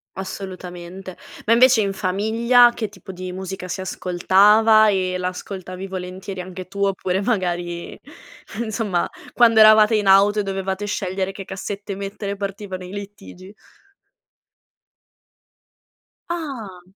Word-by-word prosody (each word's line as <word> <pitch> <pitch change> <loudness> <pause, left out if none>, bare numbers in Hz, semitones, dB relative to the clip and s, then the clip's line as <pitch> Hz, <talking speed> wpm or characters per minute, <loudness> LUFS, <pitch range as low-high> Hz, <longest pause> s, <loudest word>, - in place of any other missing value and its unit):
Assolutamente. 185 -1 -8 0.3
Ma 225 - +4
invece 250 0 +6
in 200 -1 -1
famiglia 225 +6 +3
che 220 -3 -4
tipo 205 -1 -11
di 185 0 -7
musica 190 0 -6
si 185 - -4
ascoltava? 205 +4 +4
E 185 -2 0
la 180 0 -2
ascoltavi 185 0 -7
volentieri 185 0 -6
anche 185 0 -8
tu 200 +1 -3
oppure 190 -1 -1
magari, 175 -5 -2 0.7
insomma, 210 -5 -1 0.3
quando 230 -2 +5
eravate 215 0 +7
in 210 -2 0
auto 200 +2 +5
e - - +1
dovevate 195 0 -3
scegliere 190 -2 -2
che 195 0 -9
cassette 200 +1 -6
mettere 200 +1 -5
partivano 195 -1 -6
i 180 - -10
litigi? 200 -1 -10 2.8
Ah! 255 - -6
195 Hz, 120 wpm, -21 LUFS, 185-210 Hz, 2.8 s, eravate